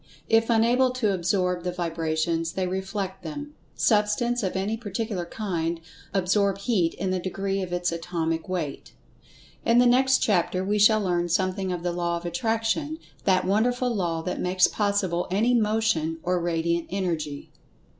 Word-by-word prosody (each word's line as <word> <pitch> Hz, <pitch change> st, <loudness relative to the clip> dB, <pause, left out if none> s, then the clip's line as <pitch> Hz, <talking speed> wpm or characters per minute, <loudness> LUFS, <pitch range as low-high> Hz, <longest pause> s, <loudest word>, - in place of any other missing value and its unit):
If 225 Hz, +1 st, +3 dB
unable 235 Hz, +3 st, +4 dB
to 220 Hz, -6 st, +1 dB
"absorb" 180 Hz, 0 st, 0 dB
the 180 Hz, +1 st, -2 dB
vibrations, 165 Hz, -1 st, -1 dB
they 190 Hz, -, -1 dB
"reflect" 190 Hz, +1 st, -3 dB
them. 290 Hz, -, -7 dB, 0.2 s
Substance, 235 Hz, +3 st, +2 dB
of 190 Hz, -3 st, -2 dB
any 195 Hz, +4 st, -1 dB
particular 210 Hz, -4 st, -4 dB
kind, 170 Hz, -5 st, -2 dB, 0.3 s
absorb 195 Hz, +1 st, +1 dB
Heat 195 Hz, -5 st, 0 dB
in 190 Hz, +1 st, -2 dB
the 185 Hz, -, 0 dB
degree 195 Hz, +2 st, -2 dB
of 185 Hz, -2 st, -5 dB
its 175 Hz, 0 st, 0 dB
atomic 165 Hz, 0 st, -2 dB
weight. 165 Hz, -7 st, -4 dB, 0.7 s
In 230 Hz, -, +3 dB
the 245 Hz, -, +6 dB
next 260 Hz, +2 st, +5 dB
chapter 185 Hz, -2 st, +1 dB
we 210 Hz, +2 st, +1 dB
shall 215 Hz, +1 st, +5 dB
learn 175 Hz, -3 st, 0 dB
something[Pg 185 Hz, +2 st, 0 dB
134] 180 Hz, -, 0 dB
of 170 Hz, -, -11 dB
The 175 Hz, -1 st, -1 dB
Law 170 Hz, 0 st, -1 dB
of 170 Hz, -, -9 dB
Attraction, 230 Hz, -, -1 dB, 0.3 s
that 185 Hz, -1 st, +3 dB
wonderful 245 Hz, +5 st, +1 dB
Law 170 Hz, -4 st, -1 dB
that 180 Hz, -, -3 dB
makes 180 Hz, 0 st, +3 dB
possible 200 Hz, -4 st, 0 dB
any 215 Hz, +7 st, +2 dB
Motion 215 Hz, -8 st, +1 dB
or 180 Hz, 0 st, +1 dB
Radiant 170 Hz, 0 st, -1 dB
Energy. 165 Hz, -7 st, -3 dB
190 Hz, 160 wpm, -25 LUFS, 175-220 Hz, 0.7 s, the